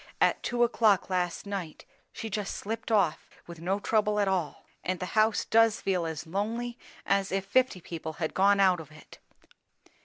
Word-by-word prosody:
"At - - +3
two 240 0 +1
o'clock 220 -5 +3
last 180 -1 -1
night, 195 -6 -6 0.3
she 225 - -6
just 205 -1 -3
slipped 225 +2 -5
off, 185 -7 +1 0.2
with 170 -2 -10
no 190 +4 0
trouble 210 0 +1
at 200 - +2
all. 180 -7 -2 0.2
And 185 -1 -2
the 180 - -3
house 215 0 +3
does 225 -1 +4
feel 180 -4 0
as 160 0 -5
lonely 230 +7 -3 0.3
as 195 -1 +1
if 195 0 -1
fifty 225 -2 +2
people 160 -1 -6
had 160 0 -3
gone 200 +1 +4
out 185 -3 +4
of 160 - -10
it. 155 - -15
195 Hz, 180 wpm, -28 LUFS, 175-215 Hz, 0.3 s, does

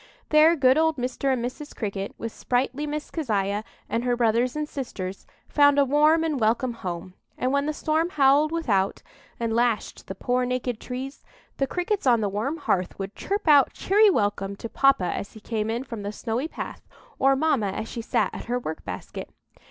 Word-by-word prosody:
There 310 +2 +6
good 265 -1 +4
old 320 -1 +2
Mr. 255 +2 -1
and 245 -2 0
Mrs. 290 +4 -7
Cricket, 200 -2 -4
with 230 - -5
sprightly 260 +6 -1
Miss 300 0 -4
Keziah 210 - -1 0.2
and 230 - -1
her 245 -1 +1
brothers 235 +2 +2
and 300 0 -2
sisters, 195 -10 -6 0.2
found 285 -1 +4
a 280 - +5
warm 305 +4 +4
and 310 -4 -1
welcome 235 +3 +1
home; 180 -4 -6 0.2
and 255 - 0
when 280 +1 +1
the - - +1
storm 315 +2 0
howled 290 0 +4
without, 210 -13 0 0.4
and 230 -1 -1
lashed 235 -2 0
the 190 - -5
poor 250 +5 0
naked 250 -2 -2
trees, 260 +2 -6 0.3
the 275 - +1
Crickets 360 +2 -1
on 240 -2 +5
the 205 -2 0
warm 220 +11 -2
hearth 185 - -1
would 195 +1 -5
chirp 400 -1 -3
out 290 -3 +6
cheery 415 +2 +4
welcome 205 - 0
to 230 - -6
papa 275 -6 +3
as 200 - -5
he 220 - -11
came 215 0 -2
in 235 +3 -1
from 230 -5 -7
the 205 0 -4
snowy 235 +6 -2
path, - - -7 0.4
or 270 0 +4
mamma 270 -7 +1
as 205 +3 -4
she 230 - -5
sat 225 - 0
at - - -7
her 245 +1 -1
work 160 -10 -5
basket. - - -7
250 Hz, 195 wpm, -25 LUFS, 220-295 Hz, 0.4 s, There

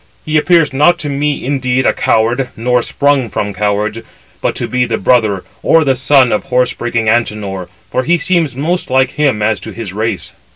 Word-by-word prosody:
He 155 - -2
appears 165 -2 +3
not 150 +6 +4
to 145 - -3
me 145 0 -2
indeed 130 -1 0
a - - +3
coward, 120 +4 +1
nor 125 +2 +1
[sprung] 140 -2 0
from 100 0 -3
cowards, 105 +2 -1 0.4
but - - -1
[to - - -3
be] 125 0 0
the - - -1
brother 110 -6 +1 0.2
or 165 -1 +4
the 135 -3 +1
son 130 0 +3
of 105 - -1
horse 125 -1 +1
breaking 115 -2 -2
Antenor, 105 -5 -1 0.2
for - - +1
he 170 +6 +2
seems 165 -5 0
most 170 +7 -2
like 130 0 +2
him 135 -8 0
as 105 -2 +1
to - - -8
his 110 -5 -7
race." 110 +3 -3
125 Hz, 195 wpm, -14 LUFS, 110-145 Hz, 0.4 s, not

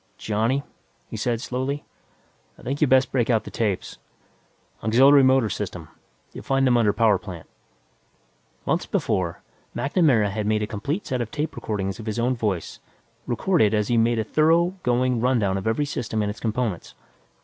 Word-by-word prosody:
"Johnny," 115 +6 0 0.5
he - - -5
said 115 +2 -1
slowly, 130 +4 -3 0.7
"I - - -17
think 140 +3 -3
you'd 150 - +4
best 130 0 +4
break 125 -3 0
out 115 -3 +2
the - - -9
tapes. 105 -5 -2 0.8
Auxiliary 135 +6 +6
motor 130 -3 +4
system; 90 -5 -5 0.4
you'll - - -9
find 135 0 +1
them 125 -2 +4
under 115 -3 +3
power 105 -2 +3
plant." 90 -6 -9 1.2
Months - - 0
before, 85 -3 -1 0.3
MacNamara 140 - +2
had 105 +1 -3
made 105 0 +1
a - - +1
complete 140 - -4
set 125 -2 -2
of 115 - -4
tape 150 +5 -4
recordings 100 -1 -3
of 110 - -8
his 110 - -3
own 125 +2 +1
voice, 105 -7 -3 0.5
recorded 120 - +2
as 105 -1 0
he 120 - +2
made 115 +1 +2
a 110 - +1
thorough 165 - +2
going 125 -2 +1
rundown 115 -6 +1
of 95 +2 -3
every 115 +7 +1
system 110 -6 -2
and 105 - -1
its 105 - -10
components. 110 -5 -3
115 Hz, 170 wpm, -24 LUFS, 105-130 Hz, 1.2 s, Auxiliary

